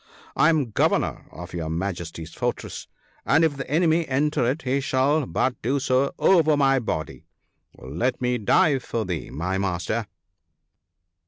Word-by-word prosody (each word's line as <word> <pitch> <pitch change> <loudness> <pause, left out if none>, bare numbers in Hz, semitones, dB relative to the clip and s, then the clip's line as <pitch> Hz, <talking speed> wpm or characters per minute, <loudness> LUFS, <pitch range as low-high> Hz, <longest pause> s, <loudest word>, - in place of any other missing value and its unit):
I 155 - +4
am 150 -8 +1
governor - - 0
of 85 +2 -10
your 80 -2 -4
Majesty's 85 -2 -4
for - - 0
tress, - - -9 0.4
and 160 +4 +3
if 160 -3 +2
the 135 - -6
enemy 165 +2 +2
enter 135 -2 +1
it 150 +5 -3
he 130 +2 0
shall 135 +1 +1
but 130 -1 -1
do 135 +5 0
so 130 +1 +1
over 160 -5 +4
my 135 -1 +3
body; 80 -9 -5 0.5
let 85 - -2
me 125 -1 0
die 135 +6 +3
for 115 -3 -3
thee, 90 -4 -4
my 90 +5 -2
Master 95 +4 -2
130 Hz, 155 wpm, -24 LUFS, 95-145 Hz, 0.5 s, I